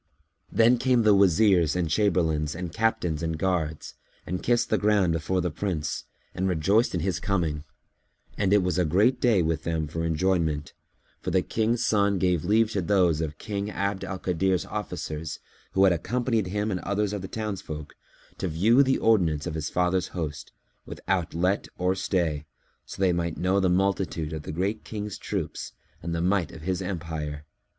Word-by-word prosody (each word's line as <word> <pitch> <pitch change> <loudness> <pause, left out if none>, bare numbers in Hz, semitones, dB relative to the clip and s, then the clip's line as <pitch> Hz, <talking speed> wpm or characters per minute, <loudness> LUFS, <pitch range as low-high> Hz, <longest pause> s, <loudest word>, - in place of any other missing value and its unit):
Then 120 +2 +4
came 125 -2 +3
the 105 -1 +6
Wazirs 95 -4 +4
and 90 -2 0
Chamberlains 80 -5 +1
and 85 -1 -5
Captains 90 -8 0
and 80 -1 -2
guards 80 -4 -2 0.3
and 90 - -3
kissed 120 0 +1
the 110 - +3
ground 100 -5 +3
before 90 +3 0
the 90 -1 -1
Prince 80 -3 -3 0.3
and 95 +1 -1
rejoiced 95 +7 +2
in 85 - -1
his 90 -1 -1
coming: 80 -7 -1 0.7
and 100 -2 0
it 100 -2 +5
was 90 0 0
a - - +4
great 105 +11 +3
day 110 -8 +4
with 80 -2 0
them 80 -2 -1
for 80 +2 -4
enjoyment, 80 -2 0 0.5
for - - -4
the - - +2
King's 115 +1 0
son 100 -2 +2
gave 90 -3 +1
leave 110 +4 +3
to 100 - 0
those 90 -4 +2
of 75 -1 -4
King 100 0 -4
Abd 100 -1 -2
al 95 - -4
Kadir's 90 0 0
officers 75 0 -5 0.4
who 95 - +4
had 95 -2 +6
accompanied 115 +4 -1
him 105 +3 -1
and 90 - -1
others 100 +1 -1
of 100 - -3
the 95 - -6
townsfolk, 95 -9 -5 0.5
to - - -1
view 105 - +4
the 135 -1 +3
ordinance 85 -10 +2
of - - -3
his 80 -1 -3
father's 90 0 +1
host, 75 -3 -4 0.3
without 90 -4 -2
let 90 +4 +1
or 90 +1 +1
stay, 85 -6 -1 0.4
so - - -9
they 95 -2 +3
might 85 -1 -2
know 95 +2 +2
the 95 -2 +2
multitude 90 -4 0
of 80 - -4
the 75 - -6
Great 95 +7 -2
King's 105 -1 -6
troops 95 -7 -4 0.3
and 85 +1 -3
the 85 - -1
might 90 -2 +1
of 80 - -11
his 90 +1 -1
empire. 80 -5 -4
90 Hz, 180 wpm, -26 LUFS, 80-100 Hz, 0.7 s, the